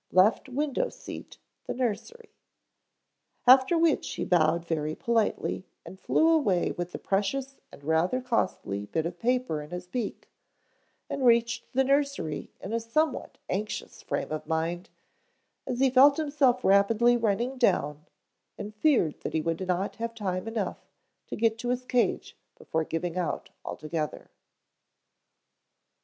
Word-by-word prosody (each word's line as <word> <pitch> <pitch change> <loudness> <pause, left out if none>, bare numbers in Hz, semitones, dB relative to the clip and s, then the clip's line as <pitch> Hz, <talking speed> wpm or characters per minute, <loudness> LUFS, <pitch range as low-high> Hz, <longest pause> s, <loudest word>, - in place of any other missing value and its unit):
Left 195 +8 +4
Window 280 +1 -1
Seat, - - -10 0.3
The - - -3
Nursery. 425 - -3 1.1
After 260 +6 +7
which 330 -2 +2
he - - -2
bowed 170 -1 +2
very 155 -2 -2
politely 225 -4 0 0.2
and 190 - -11
flew 320 - +3
away 255 - +2
with 175 0 -4
the - - -5
precious 265 +8 -1
and 140 - -14
rather 160 - +1
costly 185 - -1
bit 160 +6 -1
of 175 +1 -5
paper 245 -10 0
in 150 - -10
his 180 +1 -6
beak, 210 +3 -4 0.8
and 275 - -3
reached 235 -1 +3
the 265 +1 +3
nursery 275 - 0
in 195 - -6
a 230 - +1
somewhat 265 +6 -1
anxious 210 +3 -4
frame - - -3
of 155 0 -4
mind, 170 +5 -2 0.8
as 250 -1 -2
he 265 -1 +4
felt 275 +2 +7
himself 280 -5 +2
rapidly 215 +5 +5
running 235 +3 0
down 150 - +1 0.5
and 210 +1 -6
feared 210 - +2
that - - -4
he 160 - +1
would 165 +4 -2
not 185 +2 -1
have 230 0 -4
time 185 -2 -3
enough 225 -3 -3 0.4
to - - -5
get 225 0 +1
to 245 - -3
his 250 0 -1
cage 250 -1 0 0.2
before 160 0 -2
giving 165 +2 -3
out 175 -3 -2
altogether. 155 0 -4
220 Hz, 145 wpm, -28 LUFS, 175-255 Hz, 1.1 s, After